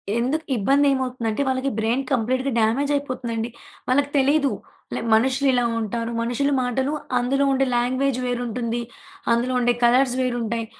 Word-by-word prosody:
ఎందుకు 265 +7 -1
ఇబ్బందేమవుతుందంటే 260 -1 +1
వాళ్ళకి 260 +1 0
బ్రైన్ 230 +5 0
కంప్లీట్‌గా 255 +2 0
డామేజ్ 255 +7 +1
అయిపోతుందండి. 245 -5 -3 0.4
వాళ్ళకి 280 +2 +2
తెలీదు 280 +1 +3 0.4
లే - - -2
మనుషులు 265 +5 +2
ఇలా 245 -1 +2 0.2
ఉంటారు 230 +2 -3
మనుషుల 245 +5 0
మాటలు, 260 +3 -1 0.3
అందులో 275 +3 +1
ఉండే 270 0 +2
లాంగ్వేజ్ 255 +2 0
వేరుంటుంది, 240 -1 -2 0.5
అందులో 245 +2 +1
ఉండే 245 0 +3
కలర్స్ 250 +1 +4
వేరుంటాయి. 235 -2 -1
250 Hz, 130 wpm, -23 LUFS, 235-270 Hz, 0.5 s, కలర్స్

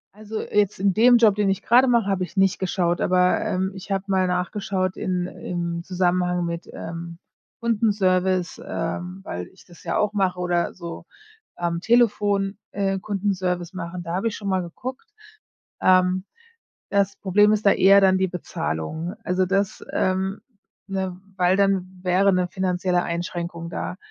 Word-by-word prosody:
Also, 215 +1 -5
jetzt 205 -2 0
in 195 0 +2
dem 240 +4 +6
Job, 225 -3 +5
den 205 -1 +1
ich 195 - -1
grade 250 +3 +5
mache, 235 -4 +3
habe 195 -2 0
ich 180 - -9
nicht 195 -1 +3
geschaut. 175 -2 0
Aber, 180 0 +3
ähm, 190 +1 -1
ich 190 +1 -10
habe 195 -1 0
mal 190 -1 +2
nachgeschaut 185 +1 -1
in 180 -1 -1
im 170 -1 -4
Zusammenhang 180 -1 0
mit, 170 0 -5
ähm, 170 0 -7 0.4
Kundenservice, 190 -6 +1
ähm, 180 +3 -4
weil 90 - -5
ich - - -20
das 175 -2 -17
ja - - -1
auch 210 0 +1
mache 190 -3 +1
oder 175 -1 0
so 170 -2 -8 0.5
am 170 -1 -2
Telefon, 205 -3 +2
äh, 195 -1 0
Kundenservice 185 -3 -2
machen. 175 -1 -6
Da 170 0 -5
habe 190 +5 0
ich 220 - -2
schon 200 -2 -5
mal 190 -1 +1
geguckt. 245 +10 -7 0.7
Ähm, 185 0 +3 0.6
das 200 0 +1
Problem 205 +2 +4
ist 215 0 0
da 200 - +7
eher 195 +1 +6
dann 190 -1 +4
die 190 - +2
Bezahlung. 160 - -4
Also 185 -1 +1
das 195 +1 -1
ähm, 190 +2 0 0.5
ne, 190 -2 -3 0.2
weil 180 +1 +3
dann 190 -2 +1
wäre 190 +2 +3
'ne 180 -1 +1
finanzielle 180 -1 0
Einschränkung 170 0 -4
da. 180 - -4
185 Hz, 160 wpm, -23 LUFS, 180-200 Hz, 0.7 s, da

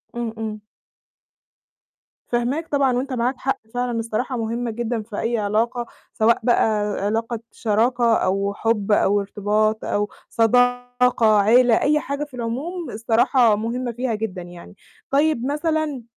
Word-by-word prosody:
إمم، 235 -2 -3
إمم. 215 -1 -5 1.7
فاهماك 250 +7 -1
طبعًا 275 -3 +2
وأنت 265 +1 -3
معاك 250 +1 0
حق 270 +2 -2
فعلًا، 245 -1 -1
الصراحة 230 +3 -2
مهمة 230 +1 -2
جدًا 235 0 -2
في 210 -1 -7
أي 235 +1 0
علاقة، 225 +4 0 0.3
سواء 225 +1 +3
بقى 240 +1 +3 0.4
علاقة 225 +2 -1
شراكة 235 +1 +2
أو 195 +1 0
حب 215 -1 -1
أو 205 0 +3
ارتباط 210 +2 0
أو 205 0 -1 0.2
صداقة 245 -1 +3
عيلة، 235 +3 +4
أي 300 +1 +3
حاجة 280 0 -4
في 290 -2 -11
العموم، 265 +8 -4
الصراحة 230 +1 +3
مهمة 240 +3 -3
فيها 240 0 -2
جدًا 210 -4 -4
يعني، 175 +1 -12 0.3
طيب 285 -3 +2
مثلًا، 300 -2 -1
235 Hz, 135 wpm, -22 LUFS, 215-250 Hz, 1.7 s, عيلة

